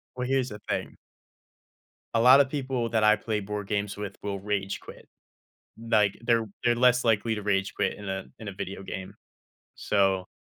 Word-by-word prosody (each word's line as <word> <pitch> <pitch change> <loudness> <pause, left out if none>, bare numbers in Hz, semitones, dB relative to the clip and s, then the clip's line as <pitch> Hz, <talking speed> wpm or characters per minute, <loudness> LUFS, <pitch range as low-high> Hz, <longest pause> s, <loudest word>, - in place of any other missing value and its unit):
Well, 125 0 -3
here's 130 -1 +1
the 105 - -8
thing - - -3 1.2
a 115 - +3
lotta 130 +4 +8
people 130 -4 -2
that 110 -1 +1
I 105 0 +6
play 110 0 -2
board 105 0 -5
games 100 -1 -1
with 105 -1 -6
will 100 -1 -3
rage 100 -1 -2
quit, - - -13 0.8
like, 105 -3 +4
they're 115 -1 +2 0.2
they're 120 -1 +3
less 125 +1 +4
likely 115 0 +2
to 105 - -5
rage 100 +2 0
quit 95 -2 0
in 105 -1 -8
a 95 0 -3
in 110 - -9
a - - -5
video 95 0 -6
game, 95 -1 -7 0.6
so 95 -2 +1
105 Hz, 180 wpm, -27 LUFS, 100-120 Hz, 1.2 s, lotta